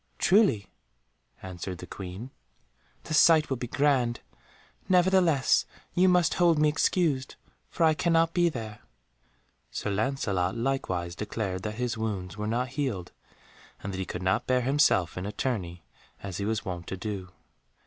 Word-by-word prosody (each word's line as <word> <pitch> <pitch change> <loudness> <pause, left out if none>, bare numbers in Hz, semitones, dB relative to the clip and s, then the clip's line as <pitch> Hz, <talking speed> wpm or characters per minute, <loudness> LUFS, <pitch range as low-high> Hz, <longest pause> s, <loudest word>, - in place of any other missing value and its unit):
"Truly," 185 - +3 0.8
answered 90 0 -6
the - - -8
Queen, 95 +7 -8 0.7
"the - - -5
sight 155 -1 +5
will 135 - 0
be 125 - -5
grand. 130 -3 +1 0.7
Nevertheless 180 -6 +3 0.3
you 185 +1 +4
must 180 -2 +3
hold 170 -3 +3
me 150 0 +4
excused, 150 -3 0 0.3
for 170 - -1
I 160 -1 +5
cannot 165 +1 +2
be 175 -1 +3
there." 110 -6 -7 0.9
Sir 105 - -3
Lancelot 100 -4 -1
likewise 95 -9 -2
declared 100 -3 -3
that 105 +2 -4
his 120 -1 -2
wounds 95 -5 -3
were 105 0 -4
not 120 +3 -1
healed 120 - -3 0.7
and 100 - -4
that 95 - -4
he 95 - -2
could 90 0 -6
not 95 +1 +1
bear 125 0 +2
himself 125 - +2
in 95 - -4
a - - -3
tourney 95 -8 -3 0.4
as 95 -3 -5
he 100 - -2
was 110 0 -2
wont 90 -2 -5
to 95 - -4
do. 95 -2 -5
115 Hz, 155 wpm, -28 LUFS, 95-150 Hz, 0.9 s, sight